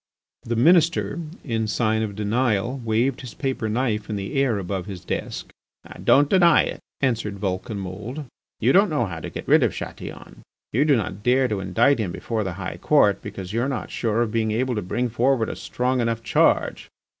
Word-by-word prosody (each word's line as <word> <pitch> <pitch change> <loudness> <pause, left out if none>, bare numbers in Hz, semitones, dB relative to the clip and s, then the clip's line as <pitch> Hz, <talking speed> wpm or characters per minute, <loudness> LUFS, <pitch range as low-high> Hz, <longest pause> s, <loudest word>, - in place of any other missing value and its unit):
The 115 - -3
Minister, 170 +6 +3 0.2
in 110 -4 -1
sign 110 0 +1
of 105 -2 -3
denial, 115 +3 0
waved 115 +4 0
his 125 -4 -9
paper 130 -5 -2
knife 110 -2 -1
in 105 - -2
the 100 +6 -4
air 125 -6 +1
above 95 0 -4
his 95 -3 -8
desk. - - -4 0.5
"Don't 145 +1 +5
deny 175 0 +5
it," - - -5 0.2
answered 115 -6 0
Vulcanmould. 100 +6 -4 0.3
"You 120 +4 +3
don't 200 +2 +5
know 150 -6 +1
how 85 -5 -6
to - - -6
get - - -7
rid - - +6
of - - +2
Chatillon. - - -8 0.3
You 135 +7 +3
do 145 -3 +5
not 105 -4 -3
dare 130 +3 +3
to 105 - -1
indict 95 +9 +2
him 100 -5 -1
before 110 +4 -3
the 95 -3 -3
High 95 +1 -6
Court 105 -10 +3
because 100 -2 -7
you 115 - +1
are 130 - 0
not 135 - -4
sure 115 0 0
of 110 - -3
being 110 -1 0
able 125 +4 0
to 105 - -2
bring 120 +7 -1
forward 120 0 +1
a - - -4
strong 125 0 -1
enough 115 -1 -1
charge. - - +2
115 Hz, 195 wpm, -23 LUFS, 105-130 Hz, 0.5 s, rid